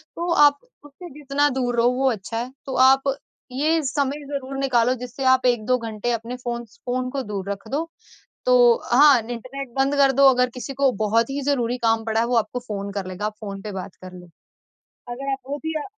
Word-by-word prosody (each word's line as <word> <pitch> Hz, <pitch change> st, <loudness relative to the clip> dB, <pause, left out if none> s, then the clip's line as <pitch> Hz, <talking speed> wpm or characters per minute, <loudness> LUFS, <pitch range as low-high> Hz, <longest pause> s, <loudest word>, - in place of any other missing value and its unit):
तो 345 Hz, +1 st, -2 dB
आप 285 Hz, 0 st, +4 dB, 0.3 s
उससे 295 Hz, +5 st, -12 dB
जितना 285 Hz, +1 st, +1 dB
दूर 250 Hz, -2 st, -1 dB
रहो 235 Hz, +1 st, +4 dB
वो 265 Hz, 0 st, +2 dB
अच्छा 225 Hz, +1 st, -5 dB
है। 245 Hz, +2 st, -4 dB
तो 265 Hz, -, -5 dB
आप 270 Hz, 0 st, +4 dB, 0.5 s
ये 310 Hz, +5 st, +1 dB
समय 280 Hz, +2 st, -1 dB
ज़रूर 275 Hz, -1 st, -5 dB
निकालो 250 Hz, -3 st, +2 dB
जिससे 250 Hz, +2 st, -6 dB
आप 260 Hz, 0 st, 0 dB
1-2 245 Hz, 0 st, +2 dB
घंटे 230 Hz, 0 st, -4 dB
अपने 230 Hz, +2 st, -3 dB
फ़ोन 240 Hz, -1 st, -5 dB
स 220 Hz, -, -24 dB
फ़ोन 255 Hz, 0 st, -2 dB
को 275 Hz, +1 st, -3 dB
दूर 200 Hz, -3 st, -5 dB
रख 200 Hz, +2 st, -7 dB
दो। 315 Hz, +4 st, -1 dB, 0.6 s
तो -, -, +5 dB, 0.4 s
हाँ, 275 Hz, 0 st, +7 dB
इंटरनेट 255 Hz, +4 st, -7 dB
बंद 275 Hz, +2 st, +2 dB
कर 275 Hz, -1 st, +4 dB
दो 275 Hz, +1 st, +5 dB
अगर 250 Hz, -1 st, +2 dB
किसी 255 Hz, +2 st, -6 dB
को 275 Hz, 0 st, +3 dB
बहुत 230 Hz, +3 st, +2 dB
ही 280 Hz, +1 st, -3 dB
ज़रूरी 245 Hz, -3 st, 0 dB
काम 225 Hz, -1 st, +1 dB
पड़ा 225 Hz, 0 st, 0 dB
है, 235 Hz, -, +1 dB
वो 245 Hz, 0 st, 0 dB
आपको 230 Hz, +2 st, 0 dB
फ़ोन 200 Hz, -1 st, -4 dB
कर 195 Hz, -2 st, -4 dB
लेगा, 185 Hz, +3 st, -4 dB
आप 215 Hz, -, -4 dB
फ़ोन 195 Hz, -2 st, -7 dB
पे 210 Hz, 0 st, -6 dB
बात 190 Hz, -1 st, -7 dB
कर 185 Hz, 0 st, -9 dB
लो। 180 Hz, -1 st, -12 dB, 0.8 s
अगर 270 Hz, +3 st, -5 dB
आप 270 Hz, -, -2 dB
वो 285 Hz, -, -2 dB
भी 320 Hz, -, -2 dB
अ, -, -, -4 dB
250 Hz, 220 wpm, -22 LUFS, 225-275 Hz, 0.8 s, हाँ